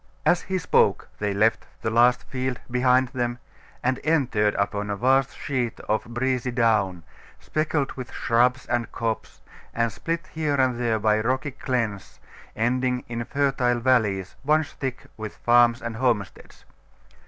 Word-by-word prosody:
As 180 - +4
he 190 - -2
spoke 180 - +2
they 105 -1 0
left 110 +3 +1 0.2
the 110 - 0
last 120 +2 +4
field 130 -1 -3
behind 125 +1 +3
them, 120 -2 -2 0.5
and 125 +1 +1
entered 125 -9 +2
upon 100 +1 -1
a 100 - -1
vast 130 +4 +2
sheet 125 -5 -2
of 110 +1 -1
breezy 125 +1 -1
down, 110 -8 +1 0.4
speckled 155 -2 -1
with 130 -2 -8
shrubs 125 +2 +1
and 120 -1 -1
copse, 115 -1 -4 0.3
and 115 0 +1
split 165 - -3
here 155 -3 0
and 130 -3 +1
there 115 -2 +1
by 105 0 +2
rocky 130 +5 -1
glens 115 -8 -3 0.4
ending 125 +2 0
in 120 0 -3
fertile 135 -3 +1
valleys 105 -7 +1
once 155 +1 +2
thick 130 -2 -5
with 110 -1 -7
farms 120 0 +4
and 115 -1 -4
homesteads. 115 -6 -2
120 Hz, 145 wpm, -25 LUFS, 110-130 Hz, 0.5 s, As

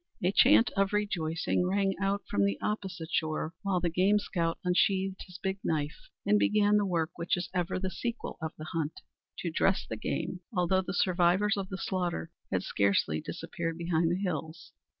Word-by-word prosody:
A 180 - +3
chant 245 +2 +6
of 195 0 +2
rejoicing 180 -4 0
rang 195 0 +1
out 200 +1 0
from 100 - +1
the 100 0 +1
opposite 185 -6 -3
shore, 155 0 -1
while 195 -3 +1
the 175 -1 0
game 190 +5 +4
scout 170 -5 -1
unsheathed 190 +1 +2
his 180 -1 -10
big 190 +1 -2
knife 150 -2 -2 0.2
and 210 +1 +4
began 210 0 +4
the 205 -1 +1
work 165 -3 0
which 170 +2 0
is 175 - -4
ever 180 -1 0
the 185 0 -2
sequel 235 +6 -4
of 160 0 -3
the 155 - -7
hunt 160 -2 -2 0.4
to 170 - -3
dress 190 +4 +2
the 110 - -4
game; 180 - -3
although 185 -2 +2
the 185 - -4
survivors 185 +3 +3
of 195 -2 -4
the 190 - -4
slaughter 180 - -2 0.2
had - - 0
scarcely 100 -6 +1
disappeared 165 -1 -4
behind 170 -1 +1
the 175 - +1
hills. 165 -3 -4
180 Hz, 185 wpm, -30 LUFS, 165-195 Hz, 0.4 s, chant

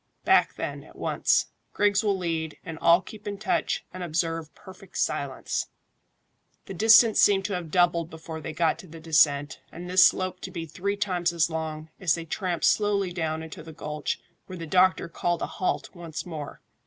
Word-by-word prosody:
"Back, - - +4
then, - - -5
at - - -17
once. - - +1 0.3
Griggs 205 0 +2
will 200 -2 +1
lead, 165 -3 -3
and 165 -2 -7
all 170 +2 +5
keep 210 +2 -11
in 200 -1 -3
touch, 210 -1 -1
and 185 - -7
observe 165 -2 -2
perfect 190 0 -12
silence." - - -2 1.0
The 195 - -7
distance 220 +3 +6
seemed 195 -2 +4
to 205 - -2
have 175 -3 -4
doubled 170 -1 +2
before 160 0 -8
they 155 - -5
got 160 0 +1
to 185 - -11
the 165 0 -11
descent, 150 -3 +2
and 175 +2 -8
this 180 0 +6
slope 185 0 +2
to - - -6
be 165 -2 -5
three 200 +6 -3
times 180 -4 0
as 170 -1 +1
long, 160 -1 -4
as 175 -5 +2
they 165 -1 -6
tramped 175 0 -2
slowly 200 -3 +2
down 160 -2 -2
into 160 0 -9
the 160 0 -11
gulch, 150 -1 -4 0.3
where 185 - -7
the 165 - -6
doctor 185 +2 +3
called 175 0 -1
a - - +1
halt 185 - -3
once 170 -3 -7
more. 155 -5 -7
175 Hz, 190 wpm, -26 LUFS, 160-190 Hz, 1.0 s, distance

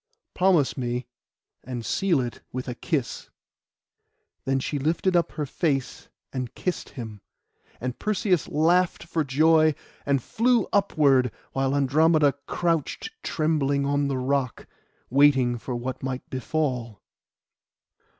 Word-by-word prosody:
Promise 180 -8 +3
me, 125 0 -2 0.6
and 120 -2 -5
seal 175 -8 +1
it 120 -1 -5
with 130 +1 -5
a 125 - -3
kiss.' 135 +1 -3 1.2
Then 135 0 +1
she 145 +2 -2
lifted 170 +6 +1
up 170 - +2
her 150 - -2
face, 140 -1 -2 0.2
and 130 -3 -4
kissed 180 - -3
him; 110 -4 -7 0.6
and 125 0 -4
Perseus 195 -5 +1
laughed 170 +4 +2
for 165 -1 -1
joy, 155 +2 +4 0.3
and 140 -1 +2
flew 230 - +2
upward, 140 - +3 0.2
while 135 +1 0
Andromeda 150 +1 +4
crouched 170 - -1
trembling 145 -3 0
on 145 0 +1
the 135 -1 -1
rock, 130 -1 -1 0.5
waiting 130 -3 +4
for 125 +2 -5
what 125 +2 -4
might 130 -1 -4
befall. 130 -5 -2
140 Hz, 120 wpm, -25 LUFS, 130-160 Hz, 1.2 s, joy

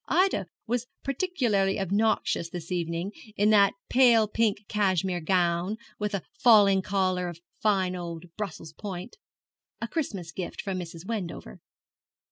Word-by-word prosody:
Ida 360 - +2 0.2
was 245 +1 -1 0.2
particularly 245 - +1
obnoxious 195 -3 +1
this 170 0 -7
evening, 170 +2 -2 0.2
in 210 +2 +3
that 200 -2 +5
pale 235 -4 +5
pink 210 -1 0
cashmere 190 -3 +1
gown, 175 +3 +1 0.2
with 210 -1 -1
a 195 - -3 0.2
falling 205 -5 +6
collar 185 -2 0
of 170 -1 -7 0.2
fine 190 -4 +2
old 170 -1 -6
Brussels 165 -6 -6
point, 190 - -7 0.6
a - - -3
Christmas 200 - -3
gift 180 0 -6
from 195 -3 -2
Mrs. 170 -1 -8
Wendover. 185 - -5
195 Hz, 130 wpm, -27 LUFS, 175-215 Hz, 0.6 s, falling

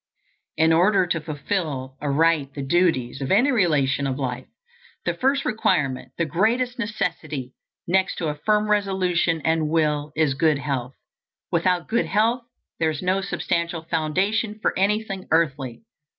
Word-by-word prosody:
In 160 0 +4
order 185 +3 +4
to 170 -2 -1
fulfill 150 -3 -3
aright 145 -1 +1
the 140 - -4
duties 135 -5 +1
of 135 - -3
any 245 +9 +4
relation 145 - +2
of 130 -1 -2
life, 125 -2 -4 0.6
the - - +1
first 275 +1 +1
requirement 130 - 0
the 170 - +1
greatest 240 +9 0
necessity, 160 - -3 0.3
next 190 +2 +2
to 160 - -2
a - - -1
firm 210 +7 +1
resolution 185 -5 +1
and 160 -1 +1
will, 150 -2 +1
is 155 -3 +2
good 150 +1 +2
health. 135 -3 -3 0.6
Without 175 0 +1
good 235 +1 +1
health 225 +5 +2 0.4
there 160 - +2
is 155 +1 -4
no 185 +2 +1
substantial 170 -3 -2
foundation 190 +7 0
for - - 0
anything 195 0 -1
earthly. 145 - 0
165 Hz, 145 wpm, -23 LUFS, 145-195 Hz, 0.6 s, In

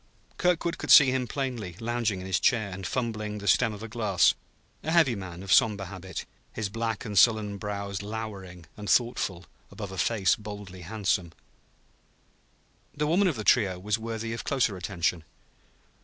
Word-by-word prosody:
Kirkwood 175 -1 +1
could - - -6
see 140 -4 +9
him 130 -1 -1
plainly, 120 - -4
lounging 115 -4 -1
in - - -7
his 95 -1 0
chair 110 -6 +2
and 95 -1 -5
fumbling 110 -4 -3
the 100 0 -7
stem 110 - +4
of 105 +1 -8
a - - -5
glass: 105 -6 +3 0.5
a 155 - -4
heavy 160 -7 +4
man, 95 -3 -7
of 95 - +1
somber 105 -3 +4
habit, 95 0 -7 0.3
his 105 -3 -3
black 115 0 -3
and 105 -2 -5
sullen 105 -3 +3
brows 100 -1 -4
lowering 100 -5 -7
and 105 -1 -7
thoughtful 100 -7 +1 0.2
above 100 -3 -7
a 95 - -6
face 105 -5 +2
boldly 100 -3 -9
handsome. 95 -3 -1 1.6
The 150 0 0
woman 180 +6 +3
of 165 - 0
the 110 - -4
trio 100 -6 +3
was 105 +4 -1
worthy 115 0 -4
of 115 - -5
closer 125 -7 +1
attention. 90 -2 -2
105 Hz, 170 wpm, -27 LUFS, 95-115 Hz, 1.6 s, see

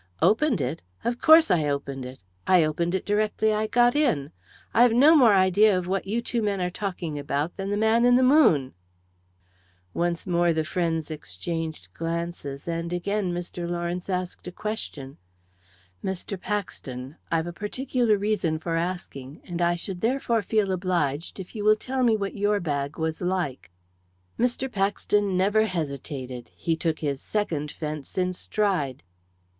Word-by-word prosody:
"Opened 230 - +3
it? 135 +5 -3 0.2
Of 240 +1 -2
course 315 -7 +7
I 160 -4 +3
opened 140 -2 -3
it! 130 -3 -11 0.3
I 180 -3 +6
opened 170 +4 0
it 190 - -2
directly 215 +1 +1
I 215 +1 0
got 240 +2 +3
in. 235 - +1 0.4
I've 240 0 +5
no 290 +7 +7
more 240 -8 +6
idea 190 +2 +4
of 180 - -2
what 190 +1 -2
you 230 +4 -1
two 235 -1 -1
men 205 -2 0
are 180 0 -1
talking 175 -6 -4
about 145 +3 -2
than 195 0 -4
the 205 - 0
man 220 +2 +3
in 245 0 +6
the 255 - +4
moon." 255 - +4 1.2
Once 170 0 -1
more 175 -1 +2
the 160 0 0
friends 165 -1 -1
exchanged 155 - -5
glances, 165 -4 -4
and 170 0 -3
again 190 +2 -1
Mr. 175 0 -4
Lawrence 175 +1 -3
asked 180 -1 -3
a - - -4
question. 165 -10 -5 0.9
"Mr. 190 +1 -3
Paxton, 140 -9 -5
I've 165 -1 +1
a 175 - -5
particular 235 +2 0
reason 200 -6 0
for 165 +1 -3
asking, 165 -6 -5
and 175 -1 -4
I 175 0 +3
should 175 +1 -6
therefore 235 -1 +1
feel 205 -1 +1
obliged 175 -4 -1
if 185 - -8
you 210 - -3
will 215 +1 +6
tell 260 +4 -3
me 230 -3 +4
what 200 -1 -3
your 205 0 +1
bag 145 -4 -2
was 160 0 -2
like?" 180 - -2 0.7
Mr. 245 +2 +1
Paxton 200 -1 +1
never 205 +4 +3
hesitated 140 - -5
he 165 -2 -1
took 160 -1 -1
his 140 -3 -2
second 165 -9 -2
fence 150 0 -6
in 180 -1 +2
his 180 - -7
stride. 180 - -1
180 Hz, 165 wpm, -26 LUFS, 160-210 Hz, 1.2 s, course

